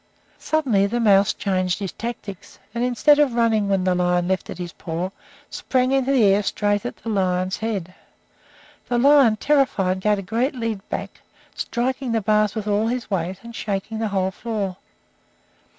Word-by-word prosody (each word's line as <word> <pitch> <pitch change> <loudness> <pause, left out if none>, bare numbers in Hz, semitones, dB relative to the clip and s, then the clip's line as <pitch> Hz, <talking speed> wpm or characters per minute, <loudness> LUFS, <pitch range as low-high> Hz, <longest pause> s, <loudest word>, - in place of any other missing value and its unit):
Suddenly 245 -11 +1
the 240 +4 -2
mouse 200 -2 +4
changed 185 -2 -1
his 195 -3 -4
tactics, 215 -5 -7 0.2
and, 235 0 -1
instead 250 +4 +4
of 275 -5 +3
running 220 -3 +2
when 195 -2 +1
the 185 0 +2
lion 180 0 +1
lifted 190 0 -2
his 175 -2 -6
paw, 175 +2 -4 0.4
sprang 255 0 0
into 270 0 +2
the 260 -5 +4
air 200 0 +4
straight 205 +2 0
at - - -7
the 230 - -7
lion's 185 -2 0
head. 200 -6 -3 1.0
The 245 - +1
lion, 270 -3 +5
terrified, 215 -9 +1
gave 210 +2 +2
a 195 - -5
great 235 +9 -1
leap 230 -4 -2
back, - - -5 0.3
striking 255 0 -2
the 225 - +1
bars 210 0 +2
with 215 -2 -3
all 210 +2 +1
his 240 -2 -3
weight, 185 0 -2
and 235 0 -10
shaking 210 +1 -3
the 225 - 0
whole 190 -2 0
floor. 205 -3 -4
210 Hz, 170 wpm, -22 LUFS, 190-240 Hz, 1.0 s, lion